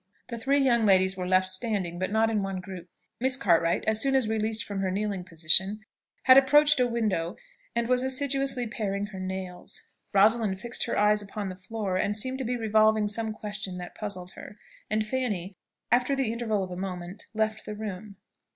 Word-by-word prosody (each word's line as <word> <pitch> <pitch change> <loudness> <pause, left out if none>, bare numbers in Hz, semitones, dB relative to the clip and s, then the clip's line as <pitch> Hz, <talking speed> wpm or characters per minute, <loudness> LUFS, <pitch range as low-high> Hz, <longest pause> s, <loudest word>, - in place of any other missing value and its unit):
The 235 - -4
three 275 +5 +2
young 240 -4 +3
ladies 190 -1 +4
were 180 -1 -4
left 185 0 +3
standing, 185 -3 -1
but 185 - -1
not 220 +1 +2
in 215 -2 0
one 195 -1 -3
group. 180 -1 -9 0.3
Miss 260 +1 +3
Cartwright, 170 -8 +2
as 220 0 +3
soon 270 -1 +2
as 260 -4 +2
released 220 0 0
from 200 -1 -5
her 190 -1 0
kneeling 200 -1 -2
position, 180 +5 +2 0.4
had 260 0 +9
approached 295 +1 +4
a 250 - +3
window, 210 -6 -1 0.4
and 235 0 0
was 250 0 +2
assiduously 270 -1 +1
paring 205 -4 -3
her 200 -2 -9
nails; 185 -1 -6 0.3
Rosalind 205 -1 +3
fixed 240 +2 -2
her 235 - -2
eyes 210 0 +3
upon 205 0 -5
the 185 - -7
floor, 190 0 -4
and 205 +2 0
seemed 260 +4 0
to - - -2
be 245 +1 -2
revolving 215 -1 +3
some 220 +1 -2
question 205 -3 -5
that 180 0 -8
puzzled 185 -4 -6
her; - - -12 0.3
and 215 0 0
Fanny, 210 -6 -3 0.4
after 250 +3 +3
the 260 -5 -1
interval 220 -4 -1
of 185 - -7
a - - -5
moment, 180 +1 -6
left 220 0 -1
the 210 - -5
room. 210 -1 -7
210 Hz, 195 wpm, -27 LUFS, 190-235 Hz, 0.4 s, had